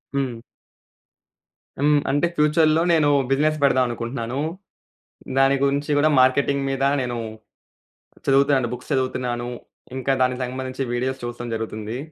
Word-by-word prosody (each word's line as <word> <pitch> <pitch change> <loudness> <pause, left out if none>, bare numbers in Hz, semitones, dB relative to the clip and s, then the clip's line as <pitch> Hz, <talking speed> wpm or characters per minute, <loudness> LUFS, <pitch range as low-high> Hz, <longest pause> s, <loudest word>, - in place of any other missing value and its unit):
హ్మ్. 125 -4 -2 1.4
హ్మ్. 145 +1 +4
అంటే 145 +5 +2
ఫ్యూచర్‌లో 155 +1 +3
నేను 155 -3 +3 0.2
బిజినెస్ 150 +3 +2
పెడదాం 130 -2 +4
అనుకుంటున్నాను. 120 +2 -4 1.0
దాని 135 +1 +4
గురించి 140 +1 0
గూడా 155 +2 +4
మార్కెటింగ్ 140 +2 +2
మీద 135 0 -2 0.2
నేను 120 -1 -3 1.1
చదువుతాను, 135 -2 +3
బుక్స్ 125 +4 -8
చదువుతున్నాను. 125 -2 -1 0.5
ఇంకా 130 +1 0
దానికి 125 0 0
సంబంధించిన 130 +1 -4
వీడియోస్ 130 +2 -2
చూడడం 120 0 -5
జరుగుతుంది. 110 +1 -5
130 Hz, 115 wpm, -22 LUFS, 125-140 Hz, 1.4 s, హ్మ్